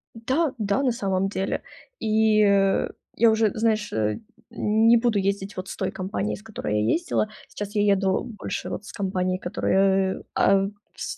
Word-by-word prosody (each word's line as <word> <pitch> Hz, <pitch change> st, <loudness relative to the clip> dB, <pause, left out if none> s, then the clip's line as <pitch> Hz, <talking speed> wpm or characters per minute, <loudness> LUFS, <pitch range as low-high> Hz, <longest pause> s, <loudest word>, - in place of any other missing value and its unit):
Да 260 Hz, +6 st, 0 dB
да, 210 Hz, +5 st, 0 dB
на 255 Hz, -, +3 dB
самом 195 Hz, -5 st, 0 dB
деле. 195 Hz, -1 st, -2 dB, 0.4 s
И -, -, -3 dB, 1.1 s
я 230 Hz, 0 st, +5 dB
уже, 220 Hz, -1 st, +2 dB
знаешь, 215 Hz, -2 st, 0 dB
э, 105 Hz, -1 st, 0 dB, 0.3 s
не 225 Hz, +2 st, +4 dB
буду 230 Hz, -3 st, +1 dB
ездить 200 Hz, 0 st, -1 dB
вот 185 Hz, +1 st, -5 dB
с -, -, -6 dB
той 190 Hz, -, -2 dB
компанией, 195 Hz, +2 st, -3 dB
с 210 Hz, -, -14 dB
которой 105 Hz, -, -2 dB
я -, -, 0 dB
ездила. 330 Hz, -10 st, 0 dB, 0.2 s
Сейчас 205 Hz, +1 st, -7 dB
я 205 Hz, -, +3 dB
еду 195 Hz, -1 st, +2 dB
больше 225 Hz, -5 st, -5 dB
вот 205 Hz, -, -5 dB
с -, -, -9 dB
компанией, 185 Hz, -2 st, -1 dB
которая, 190 Hz, +1 st, +1 dB
э, -, -, -14 dB
а 195 Hz, 0 st, +4 dB, 0.3 s
с 410 Hz, -, -5 dB
200 Hz, 170 wpm, -24 LUFS, 190-225 Hz, 1.1 s, я